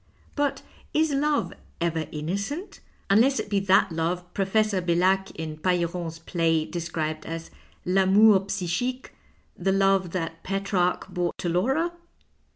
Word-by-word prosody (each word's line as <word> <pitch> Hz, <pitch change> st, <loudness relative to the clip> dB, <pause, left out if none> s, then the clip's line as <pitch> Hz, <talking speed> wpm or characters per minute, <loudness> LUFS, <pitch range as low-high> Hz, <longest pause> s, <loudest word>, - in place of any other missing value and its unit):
But 285 Hz, -2 st, -1 dB, 0.3 s
is 315 Hz, 0 st, +3 dB
love 295 Hz, +1 st, +1 dB, 0.3 s
ever 165 Hz, -2 st, -1 dB
innocent 200 Hz, -, -4 dB, 0.2 s
— -, -, -36 dB
unless 250 Hz, +7 st, +4 dB
it -, -, -5 dB
be 200 Hz, -, +3 dB
that 195 Hz, 0 st, +3 dB
love 175 Hz, +2 st, -2 dB
Professor 200 Hz, 0 st, +1 dB
Bcllac 185 Hz, +2 st, +2 dB
in 160 Hz, -1 st, -5 dB
Pailleron's 170 Hz, -1 st, -1 dB
play 165 Hz, -1 st, 0 dB
de 175 Hz, -, -5 dB
scribed 155 Hz, -2 st, -3 dB
as 165 Hz, 0 st, -6 dB, 0.3 s
V 180 Hz, +2 st, +1 dB
amour 195 Hz, +2 st, +6 dB
psychique, 195 Hz, +7 st, -2 dB, 0.5 s
the 190 Hz, +2 st, 0 dB
love 195 Hz, -1 st, +3 dB
that 165 Hz, -2 st, -4 dB
Petrarch 195 Hz, -2 st, 0 dB
bore 175 Hz, -1 st, -1 dB
to 175 Hz, -, -2 dB
Laura 265 Hz, -, +1 dB
185 Hz, 140 wpm, -26 LUFS, 170-205 Hz, 0.5 s, amour